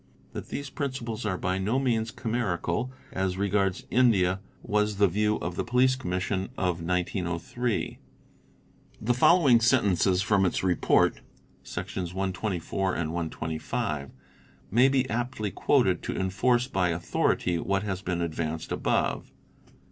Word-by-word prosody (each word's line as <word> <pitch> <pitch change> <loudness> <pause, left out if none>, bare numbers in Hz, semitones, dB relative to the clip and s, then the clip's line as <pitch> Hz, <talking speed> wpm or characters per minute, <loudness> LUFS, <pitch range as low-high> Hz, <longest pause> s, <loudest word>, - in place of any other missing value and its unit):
That - - -7
these 140 -2 -5
principles 120 -6 -3
are 95 -3 -1
by 90 +1 -1
no 105 +7 0
means 115 -4 +1
chimerical 110 -1 -2 0.2
as 95 -1 -1
regards 100 -1 0
India 100 -7 +3
_ - - -29 0.2
was 105 0 +1
the 100 0 +5
view 105 +4 +1
of 85 0 -4
the - - -1
Police 125 +1 +3
Commission 95 -4 -2
of 90 -3 0
1903. 90 +6 -2 1.0
The 120 +3 +1
following 135 -1 +5
sentences 100 -6 +3
_ - - -7
from 100 -2 +3
its 95 - 0
Report 90 -2 +2 0.4
(Sections 90 -1 -5
124 95 -1 -2
and 80 -1 -2
125) 80 -3 -3 0.6
may 125 +6 +5
be 130 -1 +1
aptly 120 -3 -2
quoted - - +2
to - - -4
enforce 120 +7 +1
by 95 -8 +1
authority 85 +1 0
what 100 +2 0
has 95 -3 -3
been 90 -2 -2
advanced 80 -1 -3
above. - - 0
95 Hz, 135 wpm, -27 LUFS, 90-120 Hz, 1.0 s, the